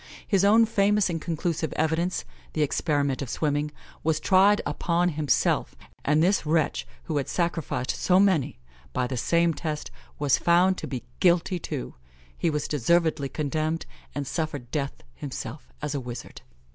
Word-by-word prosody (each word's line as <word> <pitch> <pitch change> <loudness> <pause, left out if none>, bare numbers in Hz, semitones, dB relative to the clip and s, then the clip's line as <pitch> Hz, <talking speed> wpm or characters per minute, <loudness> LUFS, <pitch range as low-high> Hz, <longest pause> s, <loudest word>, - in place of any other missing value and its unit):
His 195 -3 +3
own 220 +3 +6
famous 205 -2 +2
and 165 -2 -3
conclusive 165 -1 -2
evidence 160 +3 0 0.3
the 155 - +2
experiment 145 -2 0
of 135 - -4
swimming 145 +2 0 0.3
was 155 -1 +1
tried 195 +4 +5
upon 170 +4 +1
himself; 150 -3 +1 0.3
and 150 +2 +3
this 195 +4 +3
wretch, 150 - 0 0.2
who 155 - -2
had 140 - -1
sacrificed 170 -7 -1
so 185 0 +3
many, 190 -9 +2 0.4
by 125 - 0
the 130 +1 -3
same 170 +7 +2
test, 150 -1 -4 0.3
was 145 -2 +2
found 180 +2 +4
to - - -5
be 125 -4 -5 0.2
guilty, 175 0 +3
too. 60 - -5 0.4
He 165 - 0
was 150 -2 -1
deservedly 155 0 +1
condemned, 155 +2 -1 0.3
and 145 - -2
suffered 145 -5 -3
death 140 -3 -3
himself 140 -1 -7
as 150 0 -2
a 140 - -1
wizard. 120 -1 -8
155 Hz, 155 wpm, -26 LUFS, 145-175 Hz, 0.4 s, own